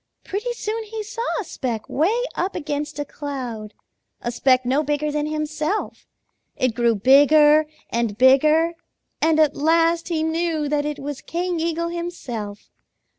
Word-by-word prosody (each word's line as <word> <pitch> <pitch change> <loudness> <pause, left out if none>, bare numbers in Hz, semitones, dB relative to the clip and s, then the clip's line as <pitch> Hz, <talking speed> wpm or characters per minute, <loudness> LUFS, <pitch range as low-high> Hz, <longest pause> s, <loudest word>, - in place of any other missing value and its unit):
Pretty 430 +5 -3
soon 450 -1 -3
he 435 0 -5
saw 435 +3 -6 0.2
a - - -2
speck 245 - -4
way 415 - +1
up 375 +2 -2
against 295 -2 -3
a 290 - -2
cloud, 250 -8 -6 0.4
a 240 - -3
speck 255 +1 +2
no 265 +4 +2
bigger 295 0 -1
than 300 0 -1
himself. 305 +5 -3 0.5
It 255 -3 0
grew 235 -1 +2
bigger 295 +6 +6 0.2
and 230 -3 -1
bigger, 305 +6 +5 0.5
and 315 0 +3
at 305 -2 +4
last 330 +2 +2
he 325 -3 -1
knew 320 -1 -1
that 295 0 0
it 300 -1 -3
was 285 -1 -6
King 350 0 -2
Eagle 335 +1 -1
himself. 255 -12 -6
300 Hz, 150 wpm, -22 LUFS, 265-335 Hz, 0.5 s, bigger